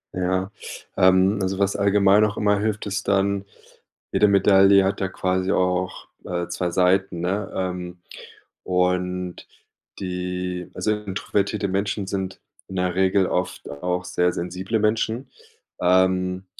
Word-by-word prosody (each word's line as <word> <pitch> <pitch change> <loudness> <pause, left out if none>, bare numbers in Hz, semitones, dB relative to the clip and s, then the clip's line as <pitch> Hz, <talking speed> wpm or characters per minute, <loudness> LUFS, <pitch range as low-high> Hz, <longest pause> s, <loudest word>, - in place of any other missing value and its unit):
Ja. 95 +1 -1 0.4
Ähm, 95 +2 +4
also, 95 0 -1
was 100 0 +1
allgemein 100 0 +4
auch 105 0 0
immer 105 -1 +2
hilft, 105 0 -2
ist 100 -1 -3
dann 100 0 +1 0.7
jede 105 - +4
Medaille 100 0 +5
hat 95 - -1
ja 95 - +1
quasi 95 0 -1
auch, 90 -1 -1 0.2
äh, 85 -1 -3
2 90 +1 -2
Seiten, 90 0 +2
ne? 95 +3 -2
Ähm, 90 -1 -4 0.7
und 90 0 -1 0.5
die 90 -1 -4
also, 110 - 0
introvertierte 100 0 -2
Menschen 100 +1 -1
sind 95 -1 -4 0.3
in 95 - -8
der 90 -1 0
Regel 95 +1 +3
oft 90 0 -3
auch 90 +5 -3
sehr 90 0 +1
sensible 90 +6 -3
Menschen. 110 +4 0 0.5
Ähm. 90 +1 +2
95 Hz, 130 wpm, -23 LUFS, 90-100 Hz, 0.7 s, Medaille